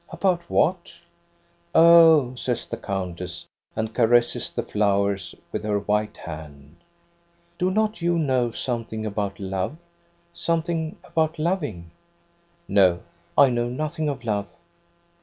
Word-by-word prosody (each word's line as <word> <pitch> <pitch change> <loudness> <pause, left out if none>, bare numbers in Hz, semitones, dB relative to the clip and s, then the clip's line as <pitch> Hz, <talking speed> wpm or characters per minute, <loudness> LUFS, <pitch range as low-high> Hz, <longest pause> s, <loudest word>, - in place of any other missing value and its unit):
"About 180 -3 -1
what.?'' 175 +1 +1 0.8
"Oh," 160 -5 +7
says 125 -1 -3
the - - -5
countess, 90 -2 -5 0.3
and 110 0 -2
caresses 120 0 +3
the - - -3
flowers 100 -3 0 0.2
with - - -3
her 105 -1 0
white 105 +1 -1
hand. 75 -1 -10 0.4
" 170 0 -39
Do 180 - +2
not 215 +1 0
you 170 0 +1
know 130 -6 +1
something 115 -2 -4
about 100 -2 -3
love, 95 +8 -3 0.6
something 165 -1 -1
about 160 -1 -1
loving? 150 - -2 0.2
" 170 0 -39
" 170 0 -39
No, 95 -3 +4 0.4
I 140 -2 +7
know 120 0 0
nothing 155 +4 -2
of 135 -3 -5
love. 105 -3 -1
120 Hz, 130 wpm, -24 LUFS, 100-165 Hz, 0.8 s, Oh